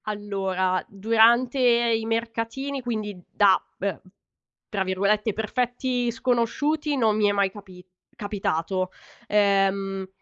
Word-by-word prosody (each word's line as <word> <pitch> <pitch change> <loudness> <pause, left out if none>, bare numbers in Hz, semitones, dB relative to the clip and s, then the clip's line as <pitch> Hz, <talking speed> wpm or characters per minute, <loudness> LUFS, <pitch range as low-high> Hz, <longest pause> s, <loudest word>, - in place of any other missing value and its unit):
Allora, 195 -3 -1
durante 230 +5 +3
i 235 -2 +3
mercatini, 230 +4 -3
quindi 215 -5 -4
da 200 -2 +4 0.2
be 195 -2 -3 0.7
tra 200 -2 -1
virgolette, 200 +3 0
"perfetti 245 +3 -1
sconosciuti", 265 +5 0
non 220 -4 +2
mi 210 -1 +3
è - - +3
mai 200 -1 +1
capi 190 -3 -13 0.3
capitato. 185 -3 -2 0.4
Ehm, 195 -1 +1
210 Hz, 105 wpm, -25 LUFS, 195-235 Hz, 0.7 s, da